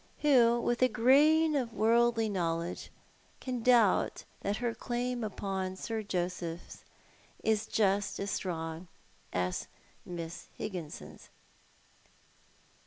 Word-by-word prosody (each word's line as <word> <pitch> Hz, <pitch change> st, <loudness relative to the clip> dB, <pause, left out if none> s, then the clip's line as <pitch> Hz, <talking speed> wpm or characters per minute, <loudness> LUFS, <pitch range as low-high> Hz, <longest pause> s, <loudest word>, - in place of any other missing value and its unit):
AVho, 240 Hz, -5 st, +5 dB
with 240 Hz, +1 st, -1 dB
a 255 Hz, -, +7 dB
grain 300 Hz, +7 st, +4 dB
of 245 Hz, -5 st, -1 dB
worldly 230 Hz, +1 st, +3 dB
knowledge, 170 Hz, -3 st, -2 dB, 0.5 s
can 250 Hz, -2 st, -4 dB
doubt 230 Hz, -4 st, +3 dB, 0.2 s
that 200 Hz, +1 st, -2 dB
her 240 Hz, -1 st, -1 dB
claim 245 Hz, 0 st, -3 dB
upon 190 Hz, -3 st, -3 dB
Sir 220 Hz, +3 st, -3 dB
JoseiA 180 Hz, -3 st, -4 dB, 0.6 s
is 220 Hz, -1 st, +1 dB
just 205 Hz, -1 st, +1 dB
as 200 Hz, +1 st, -2 dB
strong 165 Hz, -1 st, -4 dB, 0.4 s
as 90 Hz, 0 st, -2 dB, 0.4 s
Miss 170 Hz, -1 st, -7 dB
Higginson's 155 Hz, -, -7 dB
210 Hz, 105 wpm, -31 LUFS, 180-240 Hz, 0.6 s, a